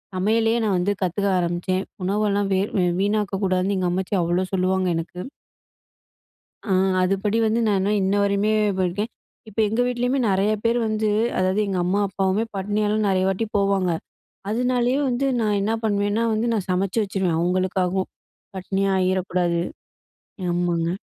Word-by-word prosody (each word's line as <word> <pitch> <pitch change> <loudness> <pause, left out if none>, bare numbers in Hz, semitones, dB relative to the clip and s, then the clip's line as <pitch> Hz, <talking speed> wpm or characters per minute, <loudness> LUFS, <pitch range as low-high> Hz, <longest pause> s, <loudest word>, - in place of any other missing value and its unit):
சமையலயே 225 +4 +2
நான் 195 -3 +1
வந்து 185 +3 +1
கத்துக்க 200 +3 0
ஆரம்பிச்சேன்." 175 +2 -1 0.2
"உணவெல்லாம் 200 0 0
வேர் 195 +2 0 0.3
வீணாக்க 205 -1 0
கூடாதுன்னு 185 +1 +1
எங்க 180 -1 0
அம்மாச்சி 190 +2 -1
அவ்ளோ 175 +2 0
சொல்லுவாங்க 185 0 +1
எனக்கு." 170 +2 -6 1.5
ஆ - - -4 0.3
அதுபடி 195 +4 +1
வந்து 220 +2 +1
நான் 205 -2 +2
இன்னும் 205 +2 +1
இன்ன 190 +1 +1
வரையுமே 200 +1 +1 0.3
போயிருக்கேன். 190 +5 -1 0.4
இப்ப 215 +1 -3
எங்க 220 +3 0
வீட்லையுமே 245 +2 0
நெறய 195 +2 +2
பேர் 235 +1 +2
வந்து, 215 0 0 0.3
அதாவது 185 +2 +1
எங்க 190 -2 -1
"அம்மா, 195 +3 +1
அப்பாவுமே 195 +2 0
பட்டினியால 205 +2 0
நெறய 190 -1 +2
வாட்டி 195 +4 -1
போவாங்க. 195 -2 +1 0.6
அதனாலயே 245 +2 +1
வந்து 250 +2 0
நான் 210 -2 +1
என்ன 215 - 0
பண்ணுவேன்னா, 205 +1 +1
வந்து 220 +2 0
நான் 200 -4 -2
சமைச்சு 190 +4 0
வச்சுருவேன். 190 -4 -1
அவங்களுக்காகவும் 185 +1 0 0.5
பட்டினியாயிரக் 190 0 0
கூடாது." 175 -1 +1 0.9
ஆமாங்க. 175 -1 0
195 Hz, 140 wpm, -23 LUFS, 185-215 Hz, 1.5 s, சமையலயே